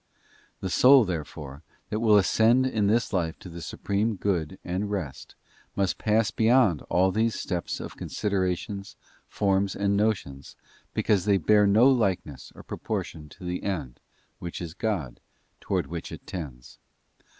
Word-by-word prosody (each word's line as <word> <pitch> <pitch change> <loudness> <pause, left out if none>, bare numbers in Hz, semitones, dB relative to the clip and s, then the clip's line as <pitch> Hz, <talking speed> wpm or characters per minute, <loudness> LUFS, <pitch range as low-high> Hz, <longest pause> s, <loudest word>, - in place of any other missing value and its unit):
The 95 - -2
soul, 130 +2 +7
therefore, 75 -5 -6 0.3
that 110 - -1
will 110 -2 +5
ascend 115 +5 +4
in 110 -6 +1
this 115 +2 +1
life 85 -3 -1
to 90 - -11
the 85 0 -8
Supreme 105 +6 -1
Good 90 -3 -1
and 95 +3 -2
Rest 75 -10 -5 0.4
must 95 -2 0
pass 110 0 +2
beyond 110 - +3
all 95 +1 +3
these 110 +3 +1
steps 90 -3 -3
of - - -7
considerations, 100 0 -2 0.3
forms, 100 -1 0
and 100 0 +1
notions, 95 -11 -1 0.4
because 100 -3 +2
they 100 -2 +4
bear 105 +4 +4
no 110 +6 +6
likeness 95 - 0
or - - -11
proportion 75 -2 -5
to 90 - -14
the 90 0 -3
end, 75 -11 -4 0.4
which 85 -1 -6
is 85 -2 -6
God, 90 - -3 0.4
towards - - -1
which 85 -1 -6
it - - -9
tends. 70 -9 -8
95 Hz, 150 wpm, -26 LUFS, 85-105 Hz, 0.4 s, soul